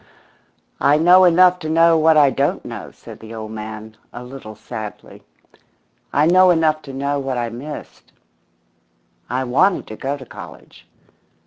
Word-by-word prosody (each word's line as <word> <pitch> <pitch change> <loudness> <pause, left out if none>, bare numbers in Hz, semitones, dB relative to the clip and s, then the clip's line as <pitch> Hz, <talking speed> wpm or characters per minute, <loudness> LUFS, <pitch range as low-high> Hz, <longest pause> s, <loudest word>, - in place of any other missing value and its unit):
"I 145 +2 +3
know 180 +4 +6
enough 180 +1 +4
to 155 - -6
know 165 +1 +4
what 160 0 +4
I 145 -2 +5
don't 140 +2 -1
know," - - -8
said - - -14
the 110 +1 -11
old 110 -1 -7
man, 110 0 -8
a 120 - -9
little 125 -4 -10
sadly. 110 0 -9 0.9
"I 145 +2 +2
know 185 +2 +5
enough 160 -3 +2
to - - -5
know 140 +2 -2
what 135 -2 -3
I 120 -1 -2
missed. 140 +6 -10 1.2
I 130 +2 -1
wanted 155 +10 +1
to 110 - -9
go 140 +5 -4
to 130 - -12
college. - - -13
140 Hz, 155 wpm, -19 LUFS, 120-160 Hz, 1.2 s, know